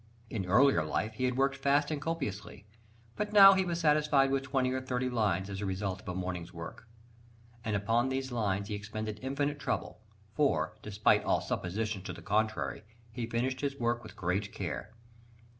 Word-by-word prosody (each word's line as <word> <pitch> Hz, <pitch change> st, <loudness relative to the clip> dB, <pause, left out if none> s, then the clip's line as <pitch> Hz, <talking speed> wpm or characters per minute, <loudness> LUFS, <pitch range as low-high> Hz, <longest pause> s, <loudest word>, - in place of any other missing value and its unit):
In 95 Hz, -5 st, -3 dB
earlier 120 Hz, -, +5 dB
life 110 Hz, +8 st, -2 dB
he 130 Hz, +4 st, -1 dB
had 125 Hz, 0 st, 0 dB
worked 135 Hz, +1 st, +2 dB
fast 145 Hz, +2 st, +2 dB
and 150 Hz, -2 st, -2 dB
copiously, 110 Hz, -, -4 dB, 0.5 s
but 210 Hz, 0 st, -3 dB
now 195 Hz, -1 st, +10 dB
he 190 Hz, 0 st, +2 dB
was 170 Hz, -2 st, -2 dB
satisfied 150 Hz, -3 st, +3 dB
with 135 Hz, 0 st, +1 dB
twenty 135 Hz, -2 st, 0 dB
or 130 Hz, 0 st, -1 dB
thirty 125 Hz, -1 st, -2 dB
lines 105 Hz, -5 st, +1 dB
as 100 Hz, -1 st, -5 dB
the 105 Hz, -, -3 dB
result 95 Hz, 0 st, -3 dB
of -, -, -9 dB
a 90 Hz, -, -3 dB
morning's 90 Hz, -2 st, -4 dB
work. 85 Hz, +7 st, -9 dB, 0.8 s
And 110 Hz, -2 st, -1 dB
upon 115 Hz, +5 st, +1 dB
these 130 Hz, 0 st, -2 dB
lines 100 Hz, -4 st, -1 dB
he 105 Hz, -, -4 dB
expended 110 Hz, +1 st, -5 dB
infinite 140 Hz, +2 st, -1 dB
trouble; 110 Hz, -, -3 dB, 0.3 s
for, 145 Hz, -5 st, +1 dB
despite 105 Hz, -1 st, +2 dB
all -, -, +2 dB
suppositions 100 Hz, +2 st, -3 dB
to -, -, -4 dB
the -, -, -11 dB
contrary, 110 Hz, +1 st, 0 dB, 0.3 s
he 115 Hz, -1 st, -4 dB
finished 130 Hz, +3 st, -1 dB
his 140 Hz, -1 st, -1 dB
work 120 Hz, -1 st, 0 dB
with 110 Hz, -, -12 dB
great 95 Hz, +3 st, -1 dB
care. -, -, -5 dB
120 Hz, 185 wpm, -31 LUFS, 100-135 Hz, 0.8 s, now